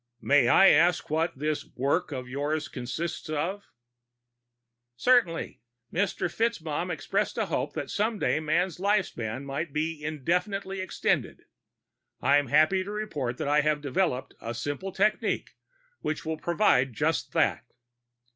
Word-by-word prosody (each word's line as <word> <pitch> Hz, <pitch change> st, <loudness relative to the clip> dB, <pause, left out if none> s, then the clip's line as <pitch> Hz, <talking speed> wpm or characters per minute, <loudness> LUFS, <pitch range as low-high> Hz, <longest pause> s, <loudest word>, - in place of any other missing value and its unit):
"May 140 Hz, -4 st, +4 dB
I 195 Hz, +9 st, +7 dB
ask 165 Hz, +1 st, +3 dB
what 160 Hz, -1 st, 0 dB
this 150 Hz, +2 st, -1 dB
'work' 140 Hz, +7 st, -1 dB
of 130 Hz, -3 st, -5 dB
yours 145 Hz, +4 st, -2 dB
consists 140 Hz, +7 st, -5 dB
of?" 170 Hz, +7 st, -2 dB, 1.3 s
"Certainly. 225 Hz, -, +2 dB, 0.3 s
Mr. 180 Hz, 0 st, 0 dB
FitzMaugham 175 Hz, -5 st, -1 dB
expressed 195 Hz, +6 st, -1 dB
a 220 Hz, -, +1 dB
hope 145 Hz, -5 st, -2 dB
that 140 Hz, -, -4 dB
someday 210 Hz, -7 st, 0 dB
man's 165 Hz, +3 st, 0 dB
life 200 Hz, 0 st, +2 dB
span 115 Hz, +4 st, -5 dB
might 140 Hz, +3 st, -3 dB
be 155 Hz, 0 st, -2 dB
infinitely 180 Hz, +6 st, -1 dB
extended. 185 Hz, -, -1 dB, 0.7 s
I'm 145 Hz, 0 st, +3 dB
happy 155 Hz, +8 st, +4 dB
to 195 Hz, -, -8 dB
report 150 Hz, -, -3 dB
that -, -, -3 dB
I 150 Hz, +1 st, +4 dB
have 150 Hz, 0 st, +1 dB
developed 145 Hz, -3 st, -1 dB
a 115 Hz, +1 st, -5 dB
simple 145 Hz, +10 st, -4 dB
technique 205 Hz, +3 st, 0 dB, 0.5 s
which 155 Hz, -, -3 dB
will 160 Hz, 0 st, -2 dB
provide 155 Hz, -, +2 dB
just -, -, -1 dB
that." -, -, +2 dB
155 Hz, 135 wpm, -28 LUFS, 145-190 Hz, 1.3 s, I